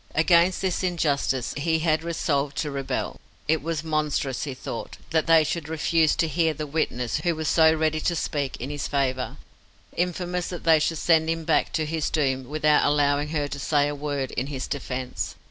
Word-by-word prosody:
Against 170 +3 +4
this 190 -2 0
injustice 145 -8 0
he 160 +3 +1
had 160 -1 +1
resolved 145 -4 -1
to 150 - -1
rebel. 140 -1 -3 0.3
It 160 0 +2
was 160 0 -3
monstrous, 150 -4 -1
he 135 -3 -5
thought, 120 - -6
that 160 0 +1
they 165 -1 +6
should 155 0 -3
refuse 160 0 +2
to 165 - +1
hear 160 0 +1
the 155 - -4
witness 135 -6 -1
who 170 -2 0
was 155 0 -3
so 160 0 +5
ready 155 0 +1
to 170 +2 0
speak 145 -4 -2
in 130 +4 -5
his 145 -1 -3
favour, 130 -2 -1 0.6
infamous 180 0 -1
that 175 - -6
they 160 -2 +5
should 160 +2 0
send 160 0 +3
him 165 0 -1
back - - +1
to 155 - 0
his 160 0 -1
doom 135 -4 0
without 150 0 +3
allowing 145 0 +2
her 150 -2 -1
to 140 - -5
say 145 0 +2
a 145 - -2
word 145 -2 -3
in 130 - -2
his 135 -3 -4
defence. 130 -3 -4
155 Hz, 195 wpm, -25 LUFS, 140-165 Hz, 0.6 s, they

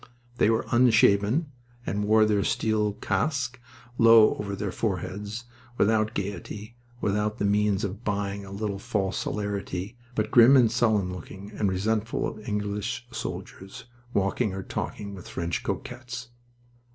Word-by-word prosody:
They - - +5
were 115 0 +1
unshaven, 120 +4 +4 0.3
and 105 +1 -1
wore 110 +1 +5
their 105 -2 +2
steel 105 -1 +1
casques 130 +6 -1 0.4
low 115 -2 +7
over 100 -1 -4
their 100 -1 -3
foreheads, 105 +3 -3 0.3
without 110 +1 +2
gaiety, 100 +3 -5 0.3
without 105 +2 0
the 100 - 0
means 105 0 +2
of 100 +3 -4
buying 100 -1 -2
a 100 - -10
little 100 0 -3
false 95 -1 -1
hilarity, 100 -1 -3 0.2
but 110 0 -1
grim 125 +3 +8
and 120 -4 +5
sullen 110 -6 +2
looking 95 +3 -9
and 105 -2 0
resentful 110 +4 0
of 110 - -7
English 105 +3 -2
soldiers 95 -3 -7 0.3
walking 100 +1 0
or 95 - -4
talking 100 +1 -5
with 95 -2 -10
French 85 0 -2
cocottes. 125 -1 -5
105 Hz, 140 wpm, -27 LUFS, 100-110 Hz, 0.4 s, grim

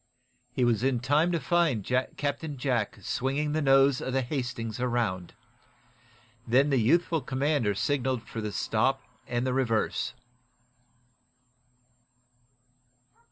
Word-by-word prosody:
He 125 0 +1
was 115 -3 +2
in 130 -1 +1
time 145 +7 +2
to 170 - 0
find 165 - +1
Captain 140 +3 -2
Jack 120 -4 -1
swinging 140 +7 -1
the 155 +1 0
nose 135 -1 +4
of 130 - -3
the 135 0 +1
"Hastings" 125 -4 -4
around. 115 -8 -1 1.1
Then 135 +5 +3
the 135 - +3
youthful 165 +7 +2
commander 130 -4 0
signaled 130 0 0
for 115 - -6
the 105 -1 -3
stop - - 0 0.2
and 120 +1 -1
the 130 - 0
reverse. 125 -1 0
130 Hz, 115 wpm, -28 LUFS, 120-145 Hz, 1.1 s, nose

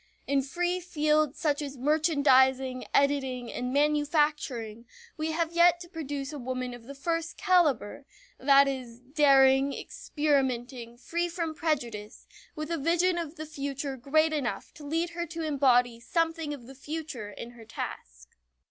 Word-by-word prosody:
In 280 -1 +2
free 350 +7 -1
fields 305 -4 +1
such 300 -3 0
as 280 -2 -6
merchandising, 265 -3 +3
editing, 265 -4 +1
and 250 0 -3
manufacturing 290 -6 0 0.3
we 315 0 -2
have 330 0 -1
yet 345 0 +5
to 350 - -8
produce 290 -4 -5
a 295 - -6
woman 255 0 -4
of 240 -1 -11
the 280 +3 -9
first 330 +3 -3
caliber; 305 - +1 0.3
that 275 +1 +6
is, 250 -4 -5
daring, 270 0 +4
experimenting, 260 - -2
free 340 +7 -2
from 335 -2 -3
prejudice, 240 -10 -3 0.3
with 305 +1 -5
a 335 - -1
vision 345 +4 +2
of 325 -1 -5
the 310 -1 -6
future 280 -2 -4
great 310 +5 +2
enough 280 -6 -3
to 310 - -13
lead 330 +3 -1
her 340 0 -4
to 330 +1 -5
embody 250 -5 +3
something 325 +4 -1
of 275 -5 -7
the 265 - -11
future 290 -5 -6
in 235 +3 -9
her 235 -2 -14
task. - - -8
285 Hz, 150 wpm, -28 LUFS, 255-320 Hz, 0.3 s, that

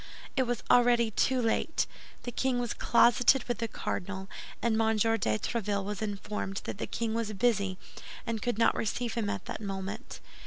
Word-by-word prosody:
It 260 -2 +2
was 245 -1 -2
already 240 -2 +5
too 260 +4 +2
late. 245 +7 +1 0.4
The 245 - -4
king 260 +1 0
was 240 -1 -1
closeted 245 +3 +4
with 240 - -3
the 230 - -1
cardinal, 190 -2 -4 0.3
and 225 -1 +1
M. 220 0 +2
de 215 - +3
Tréville 200 - -1
was 205 +2 -4
informed 205 -1 -3
that - - -5
the - - -2
king 230 -2 -2
was 225 -1 -1
busy 200 -3 +1 0.5
and 230 -2 -2
could 240 -3 -1
not 230 - +4
receive 235 +2 -2
him 220 -3 -1
at 190 - -3
that - - -5
moment. 200 +4 -5
225 Hz, 180 wpm, -30 LUFS, 205-240 Hz, 0.5 s, already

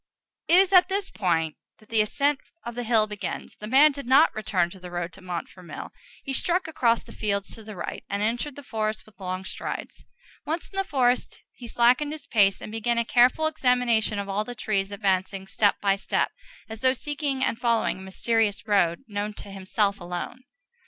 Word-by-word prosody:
It 335 - +5
is 380 +1 +5
at 365 0 +7
this 390 0 -2
point 165 -5 0 0.2
that 215 - -22
the 225 -1 +4
ascent 280 +6 +1 0.3
of 235 - -4
the 245 - -4
hill 225 -2 +4
begins. 210 -1 -6
The 210 - -7
man 280 +6 +6
did 280 -3 -7
not 275 +5 +6
return 185 -5 0
to 190 - -11
the 180 0 -9
road 175 0 -4
to 195 - -12
Montfermeil; 180 0 -7 0.3
he 270 - -4
struck 350 +6 +1
across 235 -7 +2
the - - -13
fields 200 -2 -2
to 225 - -10
the 215 -1 -9
right, 175 - -5
and 200 +1 -1
entered 240 +6 -1
the 285 - -10
forest 215 -3 -3
with 210 -3 -21
long 185 0 -4
strides. - - -6 0.4
Once 325 +3 -3
in 390 - -11
the 390 - +2
forest 255 -7 0
he 240 - -10
slackened 250 +6 +3
his 305 -2 -9
pace, 200 -7 +3
and - - -7
began 225 +2 0
a 235 - +2
careful 250 +7 +4
examination 250 -8 +2
of 200 0 -3
all 200 +2 0
the 245 +3 -7
trees, 205 -3 -1
advancing, 195 -1 -1
step 205 +1 +2
by 195 -1 +3
step, 195 - 0 0.4
as 220 0 -8
though 260 0 +4
seeking 280 -1 -2
and 225 - 0
following 230 -5 +1
a - - -10
mysterious 210 +2 0
road 195 -2 +2
known 205 0 -3
to 200 - -9
himself 200 +1 0
alone. 175 +8 -5
220 Hz, 200 wpm, -26 LUFS, 195-260 Hz, 0.4 s, at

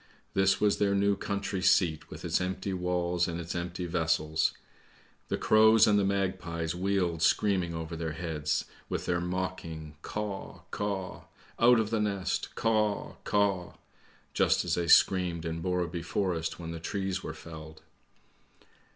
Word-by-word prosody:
This 95 0 +3
was 105 -1 +2
their 100 -1 +2
new 100 0 +3
country 100 -1 -3
seat 85 -4 +2
with - - -9
its - - +1
empty 95 +1 -2
walls 90 -1 0
and 85 0 -3
its 85 0 -5
empty 90 +1 -4
vessels. 80 -2 +1 0.8
The - - -1
crows 110 0 +6
and 105 -1 +4
the - - +2
magpies 95 -4 -1
wheeled 90 -3 0
screaming 90 -1 +2
over 80 0 -5
their 80 -1 -3
heads 80 -3 -2 0.2
with - - -3
their 85 -1 0
mocking 90 -4 -4
' - - -37
Caw, 105 0 -5
caw! 100 -3 -4 0.3
Out 120 0 +6
of 110 -1 -1
the 110 -2 +1
nest, 100 -3 -2
Caw, 105 -2 0
caw! 100 -4 +1 0.3
' - - -31
just - - +2
as - - 0
they 85 -1 0
screamed 90 -2 +4
in 80 0 -3
Borrebv 90 -2 -1
Forest 85 -2 -1
when 85 -1 -6
the 85 - -5
trees 95 +2 -2
were - - -6
felled. 80 -1 -11
90 Hz, 155 wpm, -29 LUFS, 85-100 Hz, 0.8 s, crows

